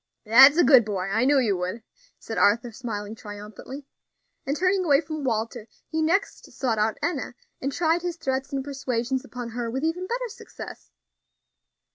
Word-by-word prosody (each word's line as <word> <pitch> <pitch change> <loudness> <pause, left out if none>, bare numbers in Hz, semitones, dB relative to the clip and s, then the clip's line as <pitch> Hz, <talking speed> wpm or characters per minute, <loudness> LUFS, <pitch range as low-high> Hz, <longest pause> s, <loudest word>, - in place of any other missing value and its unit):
"That's 265 +7 +8
a 350 - +6
good 260 -2 +7
boy; 195 -3 -3
I 225 +5 +2
knew 285 +1 +4
you 225 -7 +2
would," 185 +6 -4 0.3
said 225 - -5
Arthur, 230 +4 +3
smiling 215 -3 -5
triumphantly. 210 +6 -9 0.6
And 280 +2 0
turning 370 +2 +2
away 285 -5 +4
from 310 -1 -5
Walter, 225 -2 -2 0.2
he 320 0 -1
next 355 +6 0
sought 235 -5 -1
out 215 0 +1
Enna, 290 -7 -2 0.3
and 275 - -1
tried 330 +3 +1
his 350 -1 -3
threats 265 -3 -2
and 270 -1 -2
persuasions 260 -2 -2
upon 245 -2 -7
her 235 0 -4
with 265 +5 -3
even 345 +3 -1
better - - -2
success. 455 - -10
260 Hz, 170 wpm, -25 LUFS, 225-310 Hz, 0.6 s, That's